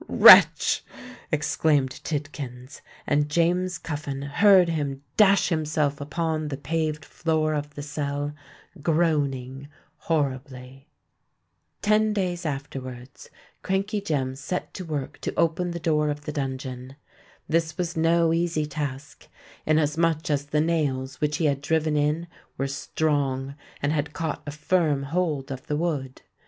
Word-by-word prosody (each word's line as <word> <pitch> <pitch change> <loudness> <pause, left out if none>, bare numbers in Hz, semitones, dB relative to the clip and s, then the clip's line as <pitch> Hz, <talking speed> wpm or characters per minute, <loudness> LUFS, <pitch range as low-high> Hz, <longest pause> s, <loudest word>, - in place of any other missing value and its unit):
"Wretch!" - - +8 0.5
exclaimed 150 -3 +1
Tidkins; 140 -4 -5 0.2
and 145 0 +1
James 175 +3 +1
Cuffin 145 -3 -5
heard 185 +6 +5
him 145 -4 -2
dash 200 -2 +5
himself 150 -3 0
upon 155 +2 -2
the 140 -2 -4
paved 155 +1 -2
floor 155 -1 0
of 150 0 -4
the 145 - -6
cell, 145 0 -3 0.5
groaning 140 -5 0 0.3
horribly. 135 -3 -3 0.9
Ten 215 +1 +3
days 180 -4 -2
afterwards, 135 -3 -7 0.3
Crankey 195 +2 -1
Jem 140 -8 -1
set 145 +7 -4
to 185 - -6
work 150 -5 -4
to - - -3
open 170 +2 +1
the 170 0 -4
door 150 -2 +1
of 145 0 -3
the 150 - -5
dungeon. 130 -2 -5 0.5
This 160 -1 0
was 175 -1 -2
no 165 0 +3
easy 165 -2 0
task; 145 -1 -6 0.4
inasmuch 155 +1 +1
as 145 0 0
the 150 +1 +1
nails 140 -5 -1
which 150 0 +1
he 165 - 0
had 140 -2 +1
driven 155 0 +1
in 150 +3 +1 0.3
were 135 - -1
strong, 140 -1 -1 0.3
and 145 +2 +2
had 150 -1 -2
caught 160 -3 -3
a - - -3
firm 150 -2 +1
hold 150 -3 -1
of 135 -1 -7
the 150 - -1
wood. 145 -6 -3
150 Hz, 135 wpm, -25 LUFS, 140-165 Hz, 0.9 s, Wretch